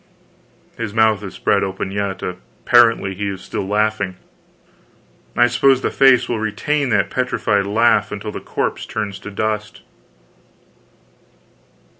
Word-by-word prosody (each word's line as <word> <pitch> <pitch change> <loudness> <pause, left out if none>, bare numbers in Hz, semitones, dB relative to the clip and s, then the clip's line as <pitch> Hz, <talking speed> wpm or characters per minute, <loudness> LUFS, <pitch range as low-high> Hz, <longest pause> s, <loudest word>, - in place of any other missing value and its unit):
His 110 -2 -4
mouth 110 -2 +3
is 100 -2 -8
spread 100 - +1
open 95 0 -4
yet; 100 -1 -3
apparently 115 +2 +2
he 100 +2 -4
is 95 -2 -5
still 95 - -5
laughing. 105 -2 0 1.2
I 120 - +6
suppose 130 +2 +3
the - - -1
face 135 -2 +4
will 115 - -2
retain 135 +7 -1
that 105 -3 +1
petrified 105 -5 0
laugh 105 -1 +2
until 105 +1 -5
the - - -6
corpse - - -3
turns 100 -2 -4
to - - -8
dust. 105 +1 -3
105 Hz, 130 wpm, -19 LUFS, 100-115 Hz, 1.2 s, I